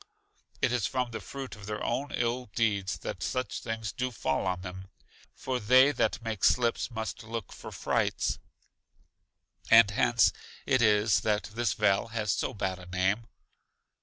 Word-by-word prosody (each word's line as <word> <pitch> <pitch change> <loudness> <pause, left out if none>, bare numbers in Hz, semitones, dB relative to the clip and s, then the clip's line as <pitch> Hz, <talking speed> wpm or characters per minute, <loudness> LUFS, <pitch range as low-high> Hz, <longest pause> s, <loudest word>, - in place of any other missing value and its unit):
it - - +3
is 120 -6 +1
from 125 +1 -2
the 110 - -4
fruit 135 +6 -7
of 105 -1 -11
their 105 0 -4
own 140 +4 -1
ill 120 +1 -1
deeds 100 -5 0
that - - -6
such 125 0 -2
things 115 -2 -4
do 130 +3 -2
fall 85 - -1
on 90 -1 -1
them. 95 +1 -8 0.5
For 130 -1 -2
they 130 +5 +6
that 120 -3 0
make 110 -4 -4
slips 120 -1 +3
must 110 -2 -5
look 115 -2 -6
for - - -9
frights. - - 0 1.3
And 115 -3 +8
hence 120 +2 +3 0.3
it 130 -2 +2
is 105 -1 +4
that 105 0 -1
this 115 -3 0
vale 95 +3 +2
has 110 -3 -1
so - - -1
bad 95 -2 -3
a 90 - -12
name. 95 +5 0
110 Hz, 165 wpm, -29 LUFS, 100-120 Hz, 1.3 s, And